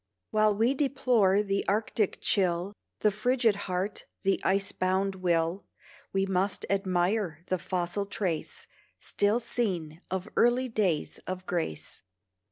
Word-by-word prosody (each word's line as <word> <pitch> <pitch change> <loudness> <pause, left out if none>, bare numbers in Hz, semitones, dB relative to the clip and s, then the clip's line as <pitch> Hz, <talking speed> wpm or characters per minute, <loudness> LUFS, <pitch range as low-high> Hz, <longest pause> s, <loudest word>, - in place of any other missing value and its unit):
While 215 -1 +3
we 230 +5 +3
deplore 250 -8 +3
the 195 -1 0
Arctic 210 0 0
chill, 185 0 +1 0.3
The 210 - +4
frigid 230 +1 +2
heart, 185 +3 -2 0.2
the 195 0 +2
ice 195 +1 +2
bound 190 +1 0
will, 175 0 0 0.4
We 195 0 +1
must 190 +1 0
admire 185 -3 0
the 185 - +1
fossil 180 +4 -2
trace, 185 -6 -3 0.3
Still 205 +3 +1
seen, 180 -10 -2
of 190 +1 -3
early 245 +2 +3
days 190 -9 0
of 185 0 -4
grace. 165 - -3
195 Hz, 125 wpm, -29 LUFS, 180-215 Hz, 0.4 s, The